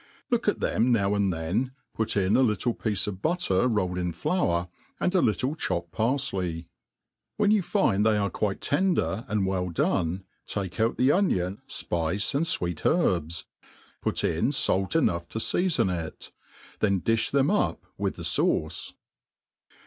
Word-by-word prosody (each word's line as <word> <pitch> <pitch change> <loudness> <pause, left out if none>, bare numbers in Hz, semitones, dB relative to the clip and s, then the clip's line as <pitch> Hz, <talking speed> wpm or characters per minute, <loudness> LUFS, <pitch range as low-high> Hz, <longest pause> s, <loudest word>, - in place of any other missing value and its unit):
Look - - +1
at - - +1
them 125 +2 +2
now 100 -4 +2
and 100 -2 +2
then, 90 +11 -1 0.2
put 110 -1 0
in 95 +1 +3
a - - +5
little 120 0 +1
piece 105 -4 -2
of 100 -3 -5
butter 155 - +1
rolled 95 -6 0
in^ 90 -2 -2
flour, 85 - 0 0.3
and 180 - +1
a 185 - +4
little 125 +6 +1
chopped 85 - -2
parfley» 100 -9 -1 0.7
When 210 -1 +3
you 215 -2 +4
find 175 - +2
they 110 -1 +3
are 100 -1 0
quite 100 -2 -2
tender 145 - +1
and 105 -3 0
well 95 -1 -1
done, 85 +2 0 0.2
take 100 0 -4
out 115 +1 +1
the 130 +2 +4
onion, 100 - +1
fpice, 85 +4 -1
and 145 +4 +1
fweet 90 - -1
herbs» 85 - +1 0.6
Put - - -1
in 85 - +1
fait 95 -5 0
enough 85 - +1
to - - -7
feafon 140 - +1
it. - - -11 0.5
Then 100 -3 +2
di(b 115 +3 +1
them 140 +3 +2
up 210 - 0
with - - -2
the - - -8
fauce. - - 0
105 Hz, 160 wpm, -27 LUFS, 90-130 Hz, 0.7 s, a